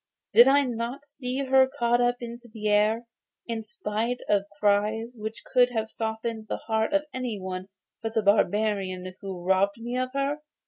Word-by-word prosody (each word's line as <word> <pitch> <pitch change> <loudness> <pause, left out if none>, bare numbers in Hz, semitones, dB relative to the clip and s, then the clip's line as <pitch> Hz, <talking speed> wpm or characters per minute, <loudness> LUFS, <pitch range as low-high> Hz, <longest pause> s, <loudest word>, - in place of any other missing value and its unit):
'Did 240 - +9
I 280 +1 +5
not 245 +3 -4
see 275 -2 -4
her 265 0 +5
caught 240 -2 +1
up 245 0 +3
into 235 +1 -8
the 215 -1 -4
air, 215 +3 +3 0.4
in 230 -1 -3
spite 220 +2 -2
of 200 -1 +2
cries 210 +3 +1
which 220 0 -6
would 250 0 +6
have 220 -2 -2
softened 220 0 -3
the - - -1
heart 220 +1 -1
of 295 0 +2
any 250 -5 -3
one 185 0 -5 0.3
but 225 0 -4
the 220 - +2
barbarian 200 -3 +1
who 190 -3 -6
has - - -6
robbed 195 +2 +3
me 240 +2 -4
of 255 0 -1
her? 275 +2 0
225 Hz, 180 wpm, -27 LUFS, 210-245 Hz, 0.4 s, Did